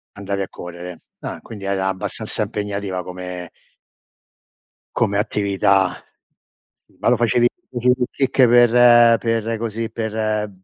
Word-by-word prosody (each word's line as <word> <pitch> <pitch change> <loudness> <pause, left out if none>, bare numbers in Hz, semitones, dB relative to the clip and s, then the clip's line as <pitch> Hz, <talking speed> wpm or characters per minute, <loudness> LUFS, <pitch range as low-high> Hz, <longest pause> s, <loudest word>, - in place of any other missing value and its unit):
Andavi 100 0 -3
a 95 - -3
correre. 90 0 -9 0.2
Ah, - - -6
quindi 105 -3 -10
era 95 -1 -1
abbastanza 105 +3 -4
impegnativa 100 -3 -4
come 90 -1 -7 1.5
come 100 - +1
attività. 100 -2 +1 1.0
Ma - - +1
lo - - +4
facevi 120 +1 +2 0.2
facevi 125 +1 +2
il 125 - +2
kick 135 -1 +3
per 120 -1 +6
per 115 -1 -1
così 115 0 -4
per 110 -1 -2
105 Hz, 120 wpm, -20 LUFS, 95-115 Hz, 1.5 s, per